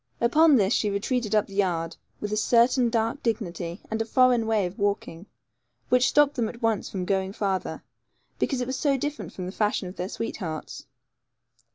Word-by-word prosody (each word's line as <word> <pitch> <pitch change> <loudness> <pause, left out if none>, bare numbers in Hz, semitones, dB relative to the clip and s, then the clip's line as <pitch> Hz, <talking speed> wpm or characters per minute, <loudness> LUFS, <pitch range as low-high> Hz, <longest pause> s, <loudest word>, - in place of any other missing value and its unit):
Upon 300 +6 +5
this, 205 -2 +3
she 210 - +1
retreated 215 +2 -1
up 210 - +3
the 195 - -14
yard, 170 -4 0 0.2
with 210 0 -4
a - - +2
certain 240 +3 +3
dark 230 +3 -1
dignity, 185 -6 -3
and 220 0 -1
a - - -1
foreign 245 -1 +3
way 215 -3 +2
of 180 +2 -7
walking, 200 -3 -2 0.6
which 250 0 +4
stopped 295 -1 +4
them 235 -5 -1
at 235 - -10
once 225 -3 0
from 185 -2 -4
going 190 0 -1
farther, 195 -3 -2 0.6
because 265 -3 0
it - - -1
was 260 +1 -3
so 280 -2 +2
different 295 +3 -4
from 185 - -6
the 185 - -5
fashion 205 -2 0
of 180 - -10
their 180 +2 -3
sweethearts. 175 -9 -5
215 Hz, 190 wpm, -26 LUFS, 190-245 Hz, 0.6 s, Upon